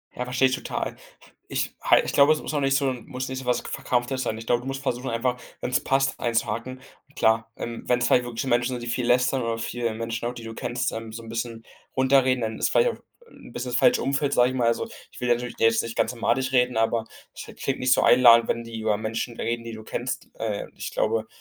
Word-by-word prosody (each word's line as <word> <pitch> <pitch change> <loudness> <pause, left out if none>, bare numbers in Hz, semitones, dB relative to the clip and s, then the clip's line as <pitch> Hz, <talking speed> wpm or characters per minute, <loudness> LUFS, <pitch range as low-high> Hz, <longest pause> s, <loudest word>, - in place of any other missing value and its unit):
Ja, 125 - -2
verstehe 125 +1 +3
ich 130 - 0
total. - - -4 0.5
Ich - - -2
ha - - +5
ich - - -1
glaube, 145 +2 +6
es 155 - -4
muss - - -5
auch 150 - +1
nicht 135 -1 +2
so 135 -1 +2
muss 130 +1 -6
nicht 130 0 -4
so 130 - -9
was 125 0 +1
Verkrampftes 125 +1 -1
sein. 110 - -2
Ich 110 - -8
glaube, 120 +1 +2
du 130 - -9
musst 135 0 -4
versuchen 125 -1 -2
einfach, 125 +2 -1 0.2
wenn's 125 - +1
passt 135 +1 +1
einzuhaken. 120 +2 -2 0.3
Und 145 - -27
klar, 110 -3 +2
ähm, 115 -1 -6
wenn 125 0 +3
es 120 - +1
halt 125 - +4
wirklich 120 -1 -4
Menschen 120 0 +1
sind, 120 - -6
die - - -6
viel 125 0 -1
lästern 125 +2 +3
oder 115 0 -1
viele 115 0 -2
Menschen 115 +1 -3
auch, 120 - -3
die 120 - -9
du 115 0 -7
kennst, 120 +2 -2
ähm 115 0 -6
so 115 +1 -7
'n 115 - -10
bisschen 115 0 -4 0.3
runterreden, 130 -1 +3
dann 110 -1 -3
ist - - +2
vielleicht - - +4
auch, - - -4
äh, 475 -1 -25
'n - - -14
bisschen 125 +1 -4
das 120 - +2
falsche 245 0 +4
Umfeld, 140 +1 0
sage 125 0 +4
ich 130 - -4
mal. 120 -2 +2
Also, 115 - 0 0.2
ich - - -13
will 125 - -1
natürlich 120 0 0
dir 115 - +4
jetzt 115 0 +2
nicht 115 0 -6
ganz - - +1
madig 130 +2 0
reden, 125 -1 +3
aber 115 0 +1 0.3
es - - -8 0.2
klingt 135 - -1
nicht 125 0 +4
so - - +2
einladend, 115 -2 +7
wenn 115 - 0
die 115 -1 -7
über 110 -1 +1
Menschen 115 +2 -4
reden, 115 0 -2
die 115 0 -7
du 110 0 -9
kennst. 125 +3 -4
Äh, 110 -2 -3
ich - - -6
glaube, 110 0 0
120 Hz, 260 wpm, -25 LUFS, 115-130 Hz, 0.5 s, einladend